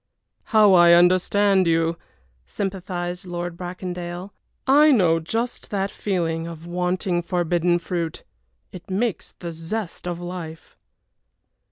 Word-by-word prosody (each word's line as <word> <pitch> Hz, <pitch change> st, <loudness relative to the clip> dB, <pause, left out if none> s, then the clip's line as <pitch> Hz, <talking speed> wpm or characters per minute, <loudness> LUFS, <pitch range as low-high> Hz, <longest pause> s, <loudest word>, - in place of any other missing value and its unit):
"How 215 Hz, -3 st, +5 dB
I 175 Hz, -1 st, +7 dB
understand 185 Hz, +2 st, +4 dB
you!" 165 Hz, 0 st, +2 dB, 0.5 s
sympathized 180 Hz, -2 st, -4 dB
Lord 175 Hz, -1 st, -4 dB
Bracondale. 180 Hz, +1 st, -6 dB, 0.3 s
"I 290 Hz, +3 st, +6 dB
know 175 Hz, -, +4 dB
just 225 Hz, +9 st, -3 dB
that 195 Hz, -1 st, -1 dB
feeling 165 Hz, -4 st, -2 dB
of 165 Hz, -1 st, -9 dB
wanting 180 Hz, +1 st, -1 dB
forbidden 175 Hz, 0 st, +1 dB
fruit. 170 Hz, -2 st, -4 dB, 0.5 s
It 185 Hz, 0 st, -11 dB
makes 205 Hz, +2 st, -2 dB
the 170 Hz, -1 st, -7 dB
zest 165 Hz, +3 st, -5 dB
of 175 Hz, -1 st, -3 dB
life." 175 Hz, -2 st, -8 dB
175 Hz, 115 wpm, -23 LUFS, 170-190 Hz, 0.5 s, I